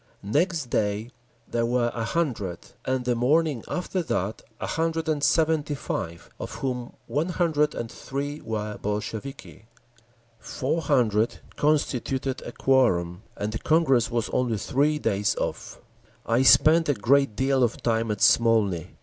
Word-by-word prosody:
Next 150 Hz, -, 0 dB
day 105 Hz, +3 st, -1 dB, 0.4 s
there 115 Hz, -, -1 dB
were 120 Hz, 0 st, +1 dB
a 115 Hz, -, -3 dB
hundred, 115 Hz, -, -1 dB, 0.3 s
and 130 Hz, -1 st, -1 dB
the 125 Hz, -, +2 dB
morning 140 Hz, +2 st, +1 dB
after 180 Hz, +1 st, -2 dB
that 105 Hz, -, -2 dB, 0.2 s
a -, -, -3 dB
hundred 165 Hz, 0 st, -1 dB
and 150 Hz, -2 st, 0 dB
seventy 155 Hz, -2 st, +2 dB
five, 85 Hz, -9 st, -5 dB
of -, -, -6 dB
whom 125 Hz, -2 st, -4 dB
one 155 Hz, +5 st, -1 dB
hundred 155 Hz, -4 st, +1 dB
and 115 Hz, -1 st, -5 dB
three 145 Hz, +2 st, -5 dB
were 105 Hz, -1 st, -4 dB
Bolsheviki…. 110 Hz, +4 st, -5 dB, 0.7 s
Four 145 Hz, +6 st, -2 dB
hundred 115 Hz, -7 st, +1 dB
constituted 135 Hz, -3 st, 0 dB
a -, -, -7 dB
quorum, 95 Hz, -11 st, +2 dB, 0.2 s
and 105 Hz, +1 st, -2 dB
the 110 Hz, -, -3 dB
Congress 150 Hz, -7 st, +3 dB
was 120 Hz, -2 st, -1 dB
only 120 Hz, -3 st, 0 dB
three 140 Hz, +9 st, +1 dB
days 100 Hz, -8 st, 0 dB
off…. -, -, -4 dB, 0.5 s
I 115 Hz, +2 st, +2 dB
spent 155 Hz, +4 st, +6 dB
a 145 Hz, -, +3 dB
great 130 Hz, +1 st, +2 dB
deal 135 Hz, +1 st, +1 dB
of 120 Hz, -2 st, 0 dB
time 115 Hz, -1 st, +1 dB
at 105 Hz, -2 st, -2 dB
Smolny. 115 Hz, -7 st, +3 dB
125 Hz, 145 wpm, -25 LUFS, 110-150 Hz, 0.7 s, spent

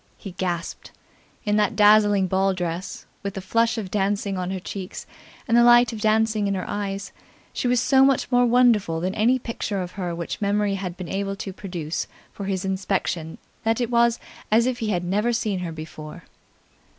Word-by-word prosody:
He 195 Hz, -, -8 dB
gasped. 175 Hz, -2 st, -4 dB, 0.6 s
In 210 Hz, 0 st, +2 dB
that 210 Hz, -, +1 dB
dazzling 205 Hz, -2 st, +5 dB
ball 190 Hz, +1 st, +1 dB
dress, 175 Hz, 0 st, -4 dB, 0.2 s
with 200 Hz, 0 st, -5 dB
the -, -, -3 dB
flush 230 Hz, +5 st, +1 dB
of 195 Hz, -4 st, -5 dB
dancing 200 Hz, 0 st, 0 dB
on 180 Hz, -1 st, -3 dB
her 190 Hz, 0 st, -3 dB
cheeks 185 Hz, +1 st, -7 dB, 0.4 s
and 230 Hz, -, +2 dB
the 235 Hz, -, +6 dB
light 240 Hz, -1 st, +6 dB
of 215 Hz, -, -6 dB
dancing 215 Hz, -1 st, +2 dB
in 200 Hz, -, 0 dB
her 185 Hz, -, -4 dB
eyes, 200 Hz, -1 st, -4 dB, 0.4 s
she -, -, -1 dB
was 245 Hz, 0 st, +3 dB
so 265 Hz, +2 st, +4 dB
much 270 Hz, -1 st, +2 dB
more 245 Hz, 0 st, +4 dB
wonderful 230 Hz, -9 st, +3 dB
than 185 Hz, +3 st, -2 dB
any 230 Hz, +4 st, +3 dB
picture 230 Hz, -4 st, -4 dB
of 180 Hz, -1 st, -4 dB
her 180 Hz, -3 st, -4 dB
which 170 Hz, +4 st, -5 dB
memory 205 Hz, 0 st, +1 dB
had 185 Hz, -2 st, -4 dB
been 180 Hz, -2 st, -6 dB
able 195 Hz, +1 st, -2 dB
to 195 Hz, -1 st, -6 dB
produce 175 Hz, -5 st, -4 dB, 0.3 s
for 200 Hz, -, -6 dB
his 190 Hz, -1 st, -2 dB
inspection 190 Hz, -4 st, -2 dB, 0.3 s
that 225 Hz, 0 st, +1 dB
it 240 Hz, -1 st, -1 dB
was 235 Hz, 0 st, +3 dB, 0.3 s
as 225 Hz, +2 st, +4 dB
if 250 Hz, -1 st, -1 dB
he 220 Hz, -3 st, -2 dB
had 180 Hz, -4 st, 0 dB
never 205 Hz, +6 st, +1 dB
seen 215 Hz, -4 st, -1 dB
her 175 Hz, -2 st, -4 dB
before. 155 Hz, -1 st, -9 dB
200 Hz, 195 wpm, -24 LUFS, 185-225 Hz, 0.6 s, the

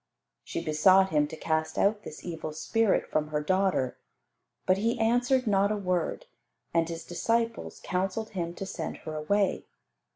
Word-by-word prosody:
She 170 Hz, -, -5 dB
besought 185 Hz, +5 st, +5 dB
Him 150 Hz, -1 st, +3 dB
to 160 Hz, -, -8 dB
cast 160 Hz, 0 st, -1 dB
out 205 Hz, +1 st, +2 dB
this 155 Hz, -, -10 dB
evil 160 Hz, -3 st, -5 dB
spirit 225 Hz, +7 st, +1 dB
from 155 Hz, 0 st, +1 dB
her 150 Hz, 0 st, -1 dB
daughter. 185 Hz, -5 st, +1 dB, 0.7 s
But 185 Hz, -, +3 dB
He 230 Hz, +3 st, +1 dB
answered 245 Hz, +3 st, +2 dB
not 200 Hz, -1 st, +3 dB
a 215 Hz, -, 0 dB
word, 180 Hz, -4 st, -1 dB, 0.5 s
and 165 Hz, 0 st, +2 dB
His 165 Hz, 0 st, -6 dB
disciples 230 Hz, +5 st, -1 dB
counselled 190 Hz, +4 st, -2 dB
Him 170 Hz, -3 st, -3 dB
to 195 Hz, -, -5 dB
send -, -, -5 dB
her 155 Hz, -, -4 dB
away. 195 Hz, +6 st, 0 dB
185 Hz, 160 wpm, -28 LUFS, 160-210 Hz, 0.7 s, besought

